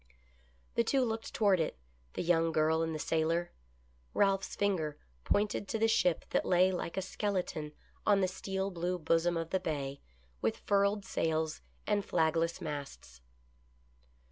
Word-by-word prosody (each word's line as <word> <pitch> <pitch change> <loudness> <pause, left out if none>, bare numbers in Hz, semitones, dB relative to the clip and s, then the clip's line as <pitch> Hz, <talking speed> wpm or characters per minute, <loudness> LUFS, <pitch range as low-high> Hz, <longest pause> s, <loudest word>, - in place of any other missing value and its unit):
The 235 - +3
two 260 +2 +2
looked 225 -1 -3
toward 200 -4 +3
it, 160 - -1 0.4
the - - -2
young 165 -1 +3
girl 160 +1 +2
and 160 -1 -1
the - - -1
sailor 165 +3 0 0.3
— 60 0 -35
Ralph's 195 -1 +2
finger 175 -7 0 0.3
pointed 205 0 +1
to 225 - -1
the 225 +1 +3
ship 180 -7 +2
that - - +2
lay 185 +1 +4
like 180 -1 -4
a 190 - 0
skeleton 180 -6 -2 0.3
on 205 -2 +4
the 190 - +3
steel 190 +1 -3
blue 180 +1 -1
bosom 165 +1 +2
of 165 0 -3
the 190 - +2
bay, 140 -5 -3 0.4
with - - 0
furled 200 0 +1
sails 160 -1 -1 0.2
and 205 -1 +1
flagless 165 -1 +1
masts. 140 - -7
175 Hz, 155 wpm, -32 LUFS, 160-195 Hz, 0.4 s, lay